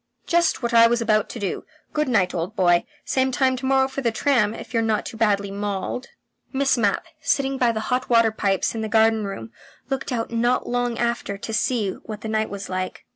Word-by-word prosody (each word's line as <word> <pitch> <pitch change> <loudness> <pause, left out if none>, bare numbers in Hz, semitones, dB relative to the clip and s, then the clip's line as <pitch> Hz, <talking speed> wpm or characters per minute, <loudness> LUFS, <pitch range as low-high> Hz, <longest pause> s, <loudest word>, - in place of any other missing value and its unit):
"Just 340 -6 +2
what 235 0 -1
I 230 0 +8
was 240 +1 +1
about 215 -2 +1
to - - -7
do. 200 -3 -3 0.3
Good 300 -1 0
night, 195 -7 +2
old 175 +5 -3
boy. 175 -4 +3 0.2
Same 260 0 +1
time 260 0 +2
to 260 - -4
morrow 265 0 +3
for 270 +1 -5
the 235 -3 +1
tram, 225 -3 +2
if - - -10
you're 230 - +2
not 220 -1 0
too - - -7
badly 205 -3 +1
mauled." 205 +5 -3 0.4
Miss 275 0 +2
Mapp, 210 -5 +1 0.2
sitting 270 -1 0
by 245 -2 +3
the 220 -1 -3
hot 255 +1 -1
water 230 -2 +5
pipes 195 -3 0
in 225 - -3
the 220 - -3
garden 220 -1 +3
room, 115 - -6 0.4
looked 270 0 -2
out 230 -2 -2
not 240 +2 +1
long 245 -1 -1
after 235 -4 -1
to 220 +2 -6
see 220 -2 +1
what 215 +2 -9
the - - -5
night 220 0 0
was 200 0 -6
like. 185 0 -4
225 Hz, 220 wpm, -23 LUFS, 205-250 Hz, 0.4 s, I